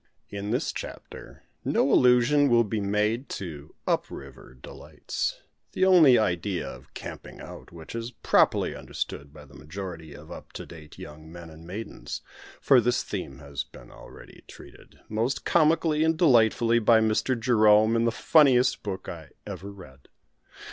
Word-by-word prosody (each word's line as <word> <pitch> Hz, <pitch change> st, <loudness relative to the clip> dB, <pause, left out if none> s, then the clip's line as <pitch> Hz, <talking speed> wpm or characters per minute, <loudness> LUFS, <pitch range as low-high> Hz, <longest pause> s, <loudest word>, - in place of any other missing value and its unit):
In 100 Hz, 0 st, -5 dB
this -, -, -1 dB
chapter -, -, -10 dB, 0.2 s
no 135 Hz, -, +1 dB
allusion 125 Hz, +3 st, +4 dB
will 120 Hz, -1 st, +4 dB
be 105 Hz, -1 st, -3 dB
made 105 Hz, +5 st, -1 dB
to 80 Hz, -6 st, -9 dB
"up -, -, 0 dB
river" 65 Hz, -, -12 dB
delights, -, -, -5 dB, 0.3 s
the 185 Hz, -, +2 dB
only 165 Hz, -9 st, +7 dB
idea 90 Hz, -3 st, -1 dB
of -, -, -12 dB
"camping -, -, -9 dB
out" -, -, -11 dB
which 80 Hz, -2 st, -11 dB
is 115 Hz, 0 st, -4 dB
properly 125 Hz, -, +1 dB
understood 70 Hz, 0 st, -6 dB
by 75 Hz, -1 st, -14 dB
the 70 Hz, -, -19 dB
majority 80 Hz, +1 st, -8 dB
of 75 Hz, +2 st, -13 dB
"up -, -, -11 dB
to -, -, -7 dB
date" 80 Hz, -3 st, -13 dB
young 80 Hz, +1 st, -11 dB
men 85 Hz, -1 st, -11 dB
and 80 Hz, +1 st, -14 dB
maidens; 105 Hz, +5 st, -7 dB, 0.4 s
for 130 Hz, -3 st, +5 dB
this 120 Hz, +2 st, 0 dB
theme 65 Hz, -, -6 dB
has 70 Hz, 0 st, -6 dB
been -, -, -16 dB
already -, -, -14 dB
treated, -, -, -15 dB
most 115 Hz, +5 st, -2 dB
comically 155 Hz, -1 st, +2 dB
and 160 Hz, 0 st, +1 dB
delightfully, 120 Hz, -6 st, +4 dB
by 115 Hz, 0 st, +5 dB
Mr. 110 Hz, +3 st, 0 dB
Jerome, 110 Hz, -1 st, +4 dB
in 115 Hz, 0 st, +2 dB
the 115 Hz, -, +2 dB
funniest 125 Hz, +1 st, +3 dB
book 95 Hz, -2 st, -6 dB
I 80 Hz, -4 st, -8 dB, 0.2 s
ever 100 Hz, -, -7 dB
read. 70 Hz, -9 st, -15 dB
110 Hz, 155 wpm, -26 LUFS, 80-125 Hz, 0.4 s, only